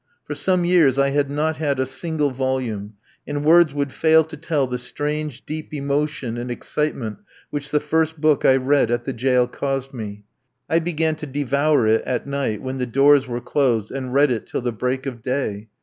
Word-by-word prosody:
For -, -, -4 dB
some 185 Hz, -2 st, +1 dB
years 165 Hz, -7 st, +4 dB
I 140 Hz, 0 st, +3 dB
had 140 Hz, 0 st, +1 dB
not 150 Hz, +2 st, -1 dB
had 145 Hz, -3 st, -1 dB
a 130 Hz, -, +2 dB
single 150 Hz, +2 st, -1 dB
volume, 125 Hz, -6 st, -2 dB, 0.3 s
and 145 Hz, 0 st, -3 dB
words 165 Hz, 0 st, +6 dB
would 140 Hz, -1 st, -2 dB
fail 160 Hz, 0 st, +5 dB
to 160 Hz, +1 st, -9 dB
tell 150 Hz, -2 st, 0 dB
the 125 Hz, -1 st, -4 dB
strange, 150 Hz, +2 st, -3 dB
deep 155 Hz, +1 st, -6 dB
emotion 140 Hz, -3 st, -2 dB
and 120 Hz, +1 st, -5 dB
excitement 120 Hz, -3 st, -3 dB, 0.3 s
which 145 Hz, 0 st, -4 dB
the 150 Hz, -, +2 dB
first 160 Hz, +1 st, 0 dB
book 155 Hz, -1 st, +3 dB
I 130 Hz, -, +6 dB
read 135 Hz, -1 st, +2 dB
at 120 Hz, 0 st, 0 dB
the 135 Hz, -, -3 dB
jail 125 Hz, +1 st, +2 dB
caused 135 Hz, 0 st, -3 dB
me. 105 Hz, -4 st, -7 dB, 0.4 s
I 165 Hz, -, +3 dB
began 160 Hz, -1 st, 0 dB
to 150 Hz, -, -6 dB
devour 140 Hz, 0 st, +1 dB
it 110 Hz, +1 st, +3 dB
at 125 Hz, -2 st, -2 dB
night, 140 Hz, -6 st, -2 dB
when 130 Hz, 0 st, -4 dB
the 125 Hz, -, -1 dB
doors 140 Hz, +2 st, +4 dB
were 120 Hz, -1 st, -4 dB
closed, 120 Hz, -8 st, 0 dB
and 130 Hz, -1 st, -4 dB
read 140 Hz, +1 st, +4 dB
it 115 Hz, -3 st, -3 dB
till -, -, -3 dB
the 120 Hz, 0 st, -1 dB
break 125 Hz, +4 st, -2 dB
of 125 Hz, -4 st, -5 dB
day. 110 Hz, -4 st, -3 dB
140 Hz, 200 wpm, -22 LUFS, 125-150 Hz, 0.4 s, words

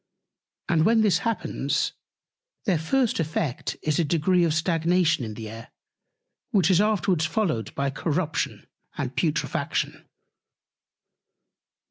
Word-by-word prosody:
And 165 Hz, -2 st, +3 dB
when 225 Hz, +4 st, +4 dB
this 195 Hz, -6 st, +3 dB
happens, 230 Hz, -1 st, -1 dB, 0.7 s
their 185 Hz, -7 st, +2 dB
first 240 Hz, +9 st, +1 dB
effect 155 Hz, -4 st, -2 dB
is 155 Hz, 0 st, +1 dB
a -, -, +4 dB
Degree 170 Hz, +3 st, +2 dB
of 165 Hz, -, +2 dB
Stagnation 165 Hz, -2 st, +2 dB
in 110 Hz, -2 st, -5 dB
the 110 Hz, -1 st, -7 dB
Air, 115 Hz, +1 st, -9 dB, 0.8 s
which 190 Hz, -3 st, +3 dB
is 185 Hz, +1 st, +5 dB
afterwards 195 Hz, -6 st, +2 dB
followed 160 Hz, -, -1 dB
by 140 Hz, 0 st, 0 dB
Corruption 160 Hz, +3 st, -2 dB, 0.3 s
and -, -, -3 dB
Putrefaction. -, -, -1 dB
165 Hz, 115 wpm, -25 LUFS, 155-190 Hz, 0.8 s, is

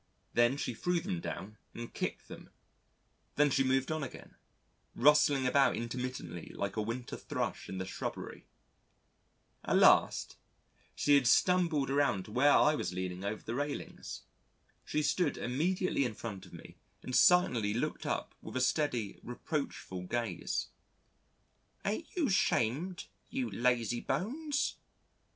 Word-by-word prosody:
Then 120 Hz, +3 st, +3 dB
she 125 Hz, -, -2 dB
threw 175 Hz, +10 st, 0 dB
them 180 Hz, 0 st, -3 dB
down, 105 Hz, -, -6 dB, 0.2 s
and 120 Hz, 0 st, -7 dB
kicked -, -, -4 dB
them. -, -, -11 dB, 0.9 s
Then 145 Hz, 0 st, +4 dB
moved 130 Hz, +2 st, +1 dB
on 155 Hz, 0 st, -1 dB
again 140 Hz, -, -8 dB, 0.6 s
rustling 145 Hz, 0 st, +5 dB
about 135 Hz, +2 st, +4 dB
intermittently 120 Hz, -8 st, -5 dB
like 100 Hz, -1 st, -3 dB
a 110 Hz, -, 0 dB
winter 115 Hz, +3 st, -4 dB
Thrush -, -, -4 dB
in 95 Hz, -, -5 dB
the 95 Hz, -, -3 dB
shrubbery. 95 Hz, -, -6 dB, 1.2 s
At -, -, +2 dB
last, -, -, +4 dB, 0.6 s
she 145 Hz, -, +3 dB
had 140 Hz, -4 st, +5 dB
stumbled 165 Hz, -1 st, +3 dB
around 135 Hz, -10 st, +2 dB
to -, -, -11 dB
where 140 Hz, +5 st, +4 dB
I 150 Hz, -, +5 dB
was 150 Hz, -, -2 dB
leaning 90 Hz, 0 st, -4 dB
over 105 Hz, +2 st, -3 dB
the 115 Hz, -, -4 dB
railings. 145 Hz, +3 st, -4 dB, 0.6 s
She 150 Hz, -, -1 dB
stood 150 Hz, +1 st, +1 dB
immediately 165 Hz, +6 st, 0 dB
in 120 Hz, -4 st, -2 dB
front 100 Hz, -4 st, -7 dB
of -, -, -18 dB
me -, -, -12 dB, 0.3 s
and 130 Hz, -, -3 dB
silently 125 Hz, -, +4 dB
looked 120 Hz, -, -2 dB
up -, -, -2 dB
with -, -, -9 dB
a -, -, +1 dB
steady 130 Hz, -5 st, 0 dB
reproachful 120 Hz, -, -4 dB
gaze: 115 Hz, -4 st, -2 dB, 1.2 s
"Ain't 215 Hz, +11 st, -1 dB
you 335 Hz, -6 st, +2 dB
'shamed, 175 Hz, -, +1 dB, 0.2 s
you 260 Hz, 0 st, -2 dB
lazy 120 Hz, -1 st, +1 dB
bones?" 275 Hz, -, -1 dB
130 Hz, 135 wpm, -32 LUFS, 115-155 Hz, 1.2 s, rustling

